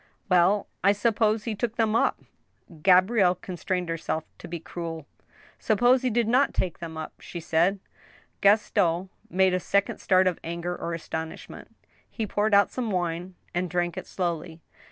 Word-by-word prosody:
Well, 180 +3 +4 0.2
I 200 +2 +5
suppose 215 0 +1
he 225 - -2
took 225 +2 -3
them 225 -2 +1
up - - +2
I - - -25
" 155 - -17
Gabrielle 185 +1 +5
constrained 180 0 -3
herself 160 -1 -2 0.2
to - - -9
be 170 0 -5
cruel. 165 -2 -6 0.3
*' - - -27
Suppose 245 +4 +3
he 255 - +1
did 235 -1 +1
not 255 +5 +3
take 180 -3 -2
them 165 -2 -7
up? 155 - -6
" - - -45
she 175 - -7
said. 170 +4 +1 0.6
Gaston 195 -3 +3 0.2
made 190 +1 +3
a 185 - +1
second 200 +3 0
start 185 0 +3
of 185 -2 0
anger 170 +1 -4
or 170 -1 -4
astonishment. 160 -1 -7 0.3
He 225 - -3
poured 205 +1 +1
out 200 0 +4
some 245 -3 -3
wine, 180 -1 -2 0.2
and 180 +1 -1
drank 175 0 -1
it - - -7
slowly. 170 -2 -3
185 Hz, 175 wpm, -26 LUFS, 170-210 Hz, 0.6 s, I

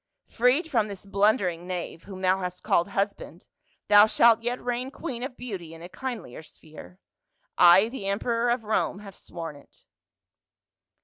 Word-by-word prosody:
Freed 260 +8 +1
from 225 -4 +2
this 200 -1 -9
blundering 195 -4 +1
knave 175 -2 -6
whom 190 -2 -9
thou 185 0 +2
hast 180 -1 -6
called 170 - +2
husband, 195 -3 -4 0.4
thou 205 +1 +7
shalt 230 0 +4
yet 240 +2 -2
reign 245 +1 -3
queen 265 -4 -6
of 255 0 -6
beauty 185 -10 -7
in 165 - -12
a 175 - -9
kindlier 220 - -7
sphere. 155 - -14 0.6
I, 180 +4 +7
the 230 -5 -6
emperor 230 +4 0
of 240 -1 0
Rome, 215 -2 -1
have 200 -2 -11
sworn 165 -3 -8
it." 145 - -19
200 Hz, 160 wpm, -26 LUFS, 180-240 Hz, 0.6 s, thou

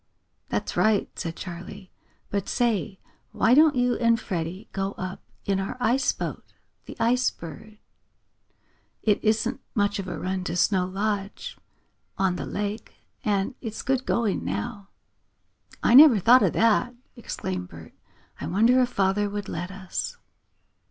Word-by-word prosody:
"That's - - -2
right," 215 -2 +2
said 165 -2 -5
Charley. 185 +2 -9 0.4
"But 200 -2 -2
say, 220 -4 0 0.3
why 225 +4 +3
don't 300 +1 +6
you 245 -1 +2
and 230 -1 +3
Freddie 185 +1 -4
go 195 0 -2
up 185 0 -6 0.2
in 195 -1 +1
our 195 +5 -4
ice 250 +2 +2
boat, - - -5 0.4
the - - -9
Ice 250 +2 +3
Bird? 190 +7 -11 1.3
It 210 -2 +2
isn't 220 +4 +1
much 205 -1 +1
of 190 - -5
a 175 -3 -4
run 185 +2 -3
to 170 - -3
Snow 180 0 +2
Lodge, 200 +1 -3 0.6
on 190 -2 +1
the - - -5
lake, 205 +2 -4 0.3
and 205 +3 0
it's 220 -3 -5
good 260 0 0
going 225 - 0
now." 100 - -4 1.0
"I - - +4
never 275 -3 +9
thought 245 +6 +6
of - - +2
that!" 230 +2 +2 0.2
exclaimed 95 - -5
Bert. 80 -1 -12 0.5
"I 145 - -4
wonder 230 +9 +4
if 250 - +1
father 200 +1 +1
would 205 -1 -5
let 175 +2 -4
us?" 190 -1 -5
205 Hz, 145 wpm, -25 LUFS, 185-230 Hz, 1.3 s, never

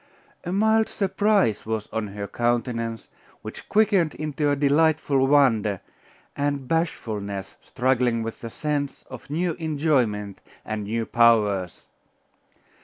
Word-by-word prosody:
A 175 - -4
mild 220 +3 +3
surprise 195 - +1
was 110 -1 -3
on 110 -1 -2
her 100 0 -6
countenance, 115 0 -2 0.4
which - - -9
quickened 200 -7 +3
into 150 -1 -1
delightful 145 -1 +2
wonder, 115 -9 +3 0.6
and 140 -2 -2
bashfulness 105 - -3
struggling 125 -2 0
with 115 0 -6
the 115 - -6
sense 145 +2 -3
of 130 0 -10
new 170 +3 -1
enjoyment 135 - 0 0.2
and 110 -1 -4
new 115 +2 -2
powers. 105 -7 +2
130 Hz, 110 wpm, -24 LUFS, 110-155 Hz, 0.6 s, mild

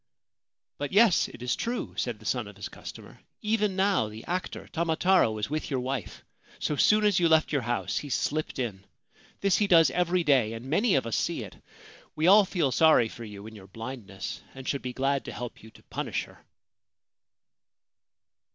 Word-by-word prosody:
' - - -64
But 145 - -3
yes: 215 -2 +5
it 120 - -11
is 125 - 0
true/ 240 +1 -3
said - - -2
the - - -17
son - - -1
of - - -11
his - - -7
customer. - - -11 0.2
'Even 210 -2 +1
now 190 - +2
the 110 +1 -10
actor 180 +1 -4
Tamataro 170 - +2
is 105 - -1
with 155 0 -2
your 135 -3 -1
wife. 130 +1 -5 0.3
So 150 - -1
soon 215 +8 +4
as 205 -4 +3
you 170 -2 +3
left 160 -1 +4
your 145 -3 +1
house 120 +1 -1
he 145 - -8
slipped 150 +5 -1
in. 110 -7 -3 0.6
This 195 -2 +3
he 205 - +2
does 165 -6 +6
every 180 +1 +1
day, 130 -8 +3
and 115 +2 -7
many 190 - +2
of 135 - +1
us 115 - -2
see - - -1
it. - - -10 0.6
We 155 - 0
all 200 +3 +7
feel 170 -8 0
sorry 140 -4 +5
for 120 - -9
you 105 -1 -10
in 110 - -9
your 95 -2 -12
blindness, 110 -3 -7
and 130 -1 -9
should 140 - -1
be 125 - -4
glad 135 +2 0
to - - -6
help 120 -1 -7
you 110 - -13
to - - -20
punish - - -3
her.' - - -17
140 Hz, 195 wpm, -28 LUFS, 120-180 Hz, 0.6 s, all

